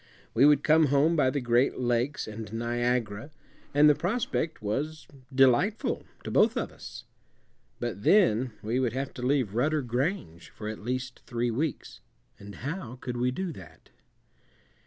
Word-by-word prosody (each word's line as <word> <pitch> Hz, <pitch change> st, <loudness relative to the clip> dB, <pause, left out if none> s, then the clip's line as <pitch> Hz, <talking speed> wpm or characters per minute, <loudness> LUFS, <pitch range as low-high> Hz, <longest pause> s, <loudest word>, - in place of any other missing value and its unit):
We 130 Hz, +5 st, +6 dB
would 145 Hz, -1 st, +4 dB
come 155 Hz, 0 st, +5 dB
home 145 Hz, +4 st, +3 dB
by 140 Hz, -5 st, +3 dB
the 140 Hz, -, -1 dB
Great 120 Hz, +2 st, +2 dB
Lakes 120 Hz, +3 st, -1 dB
and 110 Hz, -1 st, -7 dB
Niagara, 120 Hz, 0 st, -1 dB, 0.4 s
and 145 Hz, +1 st, +5 dB
the 150 Hz, -, +7 dB
prospect 175 Hz, -, -2 dB
was 145 Hz, +9 st, -3 dB, 0.2 s
delightful 135 Hz, -, +2 dB, 0.2 s
to -, -, -5 dB
both -, -, +3 dB
of -, -, -2 dB
us. -, -, -10 dB, 0.7 s
But 120 Hz, -4 st, -4 dB
then 130 Hz, -, +4 dB
we 115 Hz, +4 st, 0 dB
would 125 Hz, -3 st, 0 dB
have 135 Hz, +1 st, -3 dB
to -, -, -8 dB
leave 125 Hz, -5 st, +1 dB
Rudder 145 Hz, +5 st, +1 dB
Grange 125 Hz, -, -3 dB
for 105 Hz, -, -8 dB
at 110 Hz, 0 st, -5 dB
least 125 Hz, +2 st, -4 dB
three 120 Hz, -1 st, -1 dB
weeks, 140 Hz, +4 st, -3 dB, 0.4 s
and 100 Hz, 0 st, -10 dB
how 145 Hz, -6 st, -4 dB
could 125 Hz, -1 st, -6 dB
we 125 Hz, +1 st, +1 dB
do 180 Hz, +7 st, -3 dB
that? 80 Hz, -, -14 dB
125 Hz, 155 wpm, -28 LUFS, 115-145 Hz, 0.7 s, the